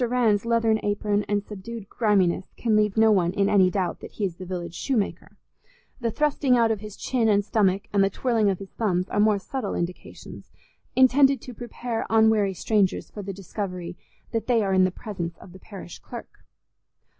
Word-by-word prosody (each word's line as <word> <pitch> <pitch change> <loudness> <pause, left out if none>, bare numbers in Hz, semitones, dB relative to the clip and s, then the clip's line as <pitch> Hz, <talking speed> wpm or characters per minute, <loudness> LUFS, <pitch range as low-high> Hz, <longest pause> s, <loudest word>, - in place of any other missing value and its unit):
Rann's 230 -4 +2
leathern 230 -1 +2
apron 205 0 0
and 205 -1 +1
subdued 210 +1 -8
griminess 195 -6 +1
can 225 -3 +1
leave 210 0 +2
no 220 0 +6
one 180 -3 +2
in 200 0 +2
any 190 -3 +4
doubt 185 -2 -2
that - - -11
he 210 - -2
is 175 -3 -4
the 185 - -8
village 175 -2 -5
shoemaker; 225 -1 -2 0.6
the 235 -2 -1
thrusting 280 0 +2
out 230 -1 +3
of 220 - -1
his 210 0 -9
chin 235 -4 0
and 205 -1 +3
stomach 200 -3 +2
and 200 -1 +4
the 195 - +3
twirling 225 0 +1
of 190 - 0
his 195 0 -10
thumbs 185 -4 -1
are - - -1
more 210 0 +4
subtle 210 +2 -4
indications, 175 +1 -7 0.4
intended 265 +1 +5
to 250 - -9
prepare 240 0 -5
unwary 220 -3 +3
strangers 200 0 0
for 210 - -7
the 195 0 -5
discovery 180 -2 -6 0.4
that 225 -2 -2
they 235 -3 +3
are 195 -1 0
in 185 0 +5
the - - +2
presence 180 -3 -6
of 175 - -14
the 190 - -12
parish 195 -4 -10
clerk. - - -11
205 Hz, 190 wpm, -25 LUFS, 190-225 Hz, 0.6 s, no